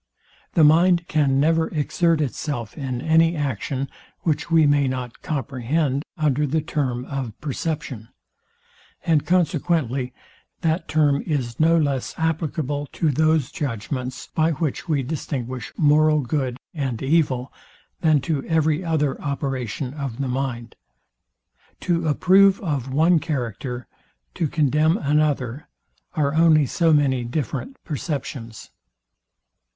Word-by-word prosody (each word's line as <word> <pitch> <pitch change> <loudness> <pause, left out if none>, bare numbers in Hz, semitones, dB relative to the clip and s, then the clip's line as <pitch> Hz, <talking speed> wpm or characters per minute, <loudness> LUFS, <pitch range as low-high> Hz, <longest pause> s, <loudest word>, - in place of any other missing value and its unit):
The 165 - +5
mind 170 +3 +5
can 140 -4 +2
never 160 +2 +3
exert 165 +1 +1
itself 125 -5 -3
in 130 -3 -4
any 165 +2 +3
action, 135 -1 -2 0.3
which 155 -1 -1
we 165 -2 +5
may 145 -1 +3
not 130 -2 -4
comprehend 140 +1 -1 0.2
under 150 -2 +1
the 160 +4 +1
term 125 -4 -2
of 130 -6 -5
perception; 140 -6 -4 1.0
and 155 -3 +2
consequently 160 -7 +1 0.5
that 165 0 0
term 145 -2 +2
is 130 -7 -2
no 165 +1 +5
less 140 -5 -1
applicable 155 -3 -1
to 160 -3 +1
those 155 -1 +2
judgments, 130 - -4
by 160 +1 +2
which 155 +3 -3
we 145 -4 +1
distinguish 130 -4 -4
moral 155 0 +4
good 130 -1 -2 0.2
and 135 -7 -3
evil, 135 -4 +1 0.5
than 155 -4 +3
to 140 -1 -1
every 160 +1 +1
other 155 -5 0
operation 135 -3 -3
of 140 -6 -5
the 135 - -1
mind. 125 -3 -3 1.1
To 170 -2 0
approve 190 +5 +5
of 140 - -2
one 160 +5 +4
character, 125 - -4 0.5
to 165 - -1
condemn 155 +3 +2
another, 145 - 0 0.5
are 145 -2 +1
only 160 -2 +5
so 165 +4 +2
many 135 -4 +3
different 150 - -4
perceptions. 135 - -5
145 Hz, 120 wpm, -23 LUFS, 130-160 Hz, 1.1 s, The